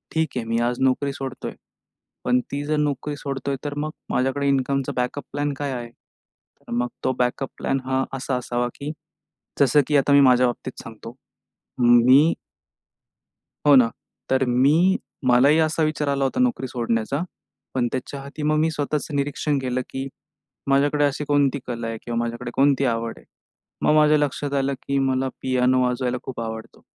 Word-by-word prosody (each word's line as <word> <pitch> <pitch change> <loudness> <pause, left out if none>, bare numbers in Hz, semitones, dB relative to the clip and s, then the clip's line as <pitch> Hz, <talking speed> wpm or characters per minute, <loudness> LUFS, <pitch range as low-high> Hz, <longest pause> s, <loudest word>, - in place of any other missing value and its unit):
ठीक 160 0 +2
आहे 120 - -2
मी 115 +1 0
आज 120 +1 0
नोकरी 135 +2 +1
सोडतोय, 135 -1 -6 0.7
पण 125 0 +3
ती 145 +1 -2
जर 155 +1 0
नोकरी 145 0 -1
सोडतोय 140 -1 -3
तर 145 - -2
मग 155 +1 -2 0.2
माझ्याकडे 135 +2 0
इन्कमचा 135 0 +1
बॅकअप 125 +3 -2
प्लॅन 145 0 -1
काय 145 -1 -2
आहे? 120 -2 -5
तर - - -23
मग 120 +1 0 0.2
तो 130 - +1
बॅकअप 125 +2 0
प्लॅन 135 - -1
हा 130 0 +1
असा 130 0 -2
असावा, 120 0 -1
की 145 +1 -5 0.7
जसं 140 +1 +5
की 150 - +3
आता 140 +1 +3
मी 140 - +7
माझ्या 125 -1 +5
बाबतीत 125 +1 -5
सांगतो. 115 +1 -10 0.6
म 120 - +3 0.2
मी 145 +6 +6 1.3
हो 145 - +8
ना. 125 -3 +6 0.4
तर 130 0 +3
मी 130 +4 +4 0.5
मलाही 130 +5 +5
असा 160 0 +1
विचार 155 -1 -1
आला 140 -1 +1
होता 135 - -1
नोकरी 245 - +1
सोडण्याचा, 120 +3 -1 0.5
पण 125 -2 +1
त्याच्या 135 +2 -4
आधी 140 +2 -7
मग 155 +1 +2
मी 160 +1 +2
स्वतःचं 150 0 -2
निरीक्षण 145 +1 0
केलं, 130 -1 -1
की 135 0 -4 0.6
माझ्याकडे 145 +2 +3
अशी 145 +1 -1
कोणती 145 -1 +2
कला 120 -2 -4
आहे? 115 0 -4
किंवा 120 -1 -3
माझ्याकडे 120 0 -4
कोणती 140 0 +3
आवड 115 -2 -1
आहे? - - -17 0.6
मग, - - +3
माझ्या 150 0 +5
लक्षात 145 -1 -1
आलं, 140 0 +1
की 140 - -1
मला 130 0 +1
पियानो 130 0 +2
वाजवायला 125 0 0
खूप 130 - -6
आवडतो 110 -1 -7
135 Hz, 170 wpm, -23 LUFS, 125-145 Hz, 1.3 s, हो